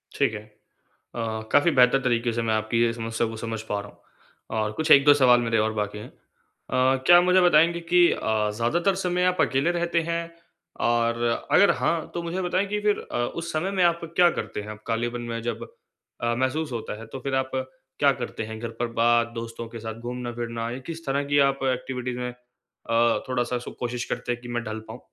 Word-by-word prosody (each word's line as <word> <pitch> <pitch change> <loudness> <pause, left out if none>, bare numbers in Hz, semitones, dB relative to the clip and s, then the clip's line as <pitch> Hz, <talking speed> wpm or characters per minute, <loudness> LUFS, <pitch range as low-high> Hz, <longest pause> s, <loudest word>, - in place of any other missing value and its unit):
ठीक - - +1
है। 110 - -4 0.8
अ, 110 -2 -3
काफ़ी 145 +4 +4
बेहतर 130 -1 +5
तरीके 120 -2 +1
से 115 - -1
मैं 115 -1 0
आपकी 110 +2 0
ये 115 - +2
समस्या 115 0 -2
को 115 - -6
समझ 115 -1 -4
पा 105 - 0
रहा 105 - -11
हूँ - - -26 0.6
और 105 - -2
कुछ 155 +5 -1
1-2 140 +1 +8
सवाल 125 -4 +5
मेरे 115 -1 0
और 110 0 +1
बाकी 105 -1 -3
है। 105 - -8
अ, - - -18 0.6
क्या 130 +6 +5
मुझे 180 +1 +4
बताएँगे 170 0 +4
कि 175 -1 +6
अ, 110 -1 0
ज़्यादातर 170 - +1
समय 180 0 +1
आप 180 - 0
अकेले 140 +5 +2
रहते 170 -1 0
हैं? 170 0 0 0.6
और 115 0 +1 0.3
अगर 200 - +6
हाँ, 165 -2 -1
तो 170 - -3
मुझे 170 +3 -3
बताएँ 185 +2 0
कि 210 +1 -2
फिर 210 0 +1
अ, - - -2 0.2
उस 170 0 -4
समय 165 +5 -1
में 190 -2 +1
आप 170 -1 +2
क्या 175 -1 +6
करते 105 - -4
हैं? 105 +1 -8
कालिबन 120 +1 -2
में 115 - -3
जब 120 +1 -4 0.6
अ, 120 0 +1
महसूस 130 +4 -1
होता 110 -2 -5
है 115 - -9
तो 135 - -6
फिर 135 +1 -2
आप 130 0 -1 0.5
क्या 140 -1 +5
करते 115 -2 -4
हैं 110 0 -7
घर 115 0 -4
पर 120 - 0
बात, 120 0 +4
दोस्तों 115 0 -6
के 115 0 -8
साथ 110 0 -5
घूमना-फिरना, 120 -1 -4
या 125 - -5
किस 165 -1 -7
तरह 140 +1 0
की 145 0 +2
आप 135 - -3
एक्टिविटीज 125 -1 -4
में 125 0 -3 0.6
अ, 115 0 +2
थोड़ा-सा 125 -1 -1
सु 120 - -8
कोशिश 120 0 -3
करते 125 0 -2
हैं 120 0 -4
कि 120 - -10
मैं 120 - -2
ढल 110 -1 -5
पाऊँ? - - -9
125 Hz, 215 wpm, -25 LUFS, 115-160 Hz, 0.8 s, 1-2